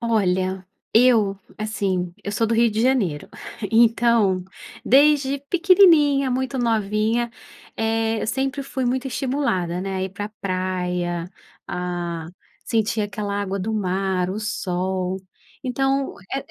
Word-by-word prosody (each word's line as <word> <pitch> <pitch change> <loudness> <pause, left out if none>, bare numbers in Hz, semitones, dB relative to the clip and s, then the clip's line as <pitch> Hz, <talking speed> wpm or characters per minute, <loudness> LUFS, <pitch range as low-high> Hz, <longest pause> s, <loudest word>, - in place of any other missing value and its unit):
Olha, 190 -4 0 0.3
eu 220 -5 +4 0.2
assim, 195 -5 -2
eu 205 - -4
sou 225 +2 +1
do 230 - 0
Rio 230 0 +4
de 215 +1 -1
Janeiro, 210 - +1 0.4
então 230 -5 +4 0.4
desde 280 0 +4
pequenininha, 330 -7 +5
muito 260 +1 -1
novinha, 225 0 +1 0.5
eh, 225 0 0
eu - - -2
sempre 270 +4 -1
fui 265 -1 -3
muito 255 +2 0
estimulada, 245 -10 -1
né, 195 0 -3
a 185 - -2
ir 190 - -3
pra 205 +2 -5
praia, 180 -2 -2 0.4
a 175 -2 -4 0.4
sentir 220 -1 0
aquela 205 -1 -3
água 195 0 -2
do 215 +4 -2
mar, 190 -2 0
o 200 - -3
sol, 185 -3 -2 0.5
então, 270 +2 0 0.2
é - - 0
215 Hz, 125 wpm, -22 LUFS, 185-250 Hz, 0.5 s, pequenininha